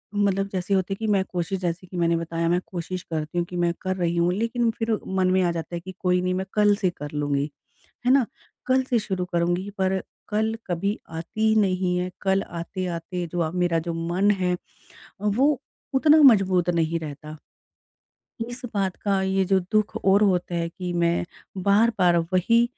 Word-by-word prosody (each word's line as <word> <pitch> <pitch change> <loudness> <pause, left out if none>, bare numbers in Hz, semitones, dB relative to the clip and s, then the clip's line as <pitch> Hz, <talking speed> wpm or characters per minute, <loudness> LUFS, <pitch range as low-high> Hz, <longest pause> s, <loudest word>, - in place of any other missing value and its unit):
मतलब 200 -1 +1
जैसे 185 +1 -1
होते 190 0 +1
है - - -3
कि 220 - -2
मैं 200 -2 +3
कोशिश 180 +1 -3
जैसे 180 0 -3
कि 180 - -7
मैंने 170 -1 +2
बताया 165 0 -2
मैं 175 +1 +3
कोशिश 180 0 -5
करती 155 +2 -3
हूँ 175 - +1
कि 180 - -7
मैं 175 -1 +2
कर 185 0 -1
रही 175 -1 0
हूँ। 170 +1 +2
लेकिन 230 +3 0
फिर 225 0 0 0.2
मन 190 -1 +1
में 185 0 +3
आ 175 - +2
जाता 170 +1 -5
है - - -2
कि 190 +2 -8
कोई 180 0 +2
नहीं 185 0 0
मैं 190 +1 -2
कल 210 -1 +4
से 200 -3 +1
कर 145 0 -6
लूँगी, 145 -1 0 0.6
है 250 - +5
ना? 270 -3 +4 0.4
कल 260 +1 +3
से 240 - +3
शुरू 190 -4 -2
करुँगी 175 +3 0
पर 190 0 +1 0.3
कल 220 +1 0
कभी 195 +4 -1
आती 165 +7 -2
ही 220 - +4
नहीं 185 -2 +1
है। 180 0 -1
कल 195 0 +2
आते-आते 175 0 -4
जो 175 - -6
हुआ 165 -2 0
मेरा 175 -2 +1
जो - - -1
मन 190 +4 +3
है 180 -3 +1 0.7
वो 255 +8 +2 0.3
उतना 300 +3 +6
मजबूत 190 - +5
नहीं 165 -1 +1
रहता। 155 0 -8 1.1
इस 245 +1 -8
बात 195 -2 0
का 195 -1 +2
ये 190 0 +1
जो 190 0 +3
दुःख 215 +1 +1
और 195 -1 +3
होता 180 -3 +1
है 170 0 0
कि 180 +1 -5
मैं 170 0 +1 0.4
बार-बार 200 -3 +4
अब 165 -1 +1
वही 230 +6 +4
185 Hz, 200 wpm, -24 LUFS, 170-200 Hz, 1.1 s, उतना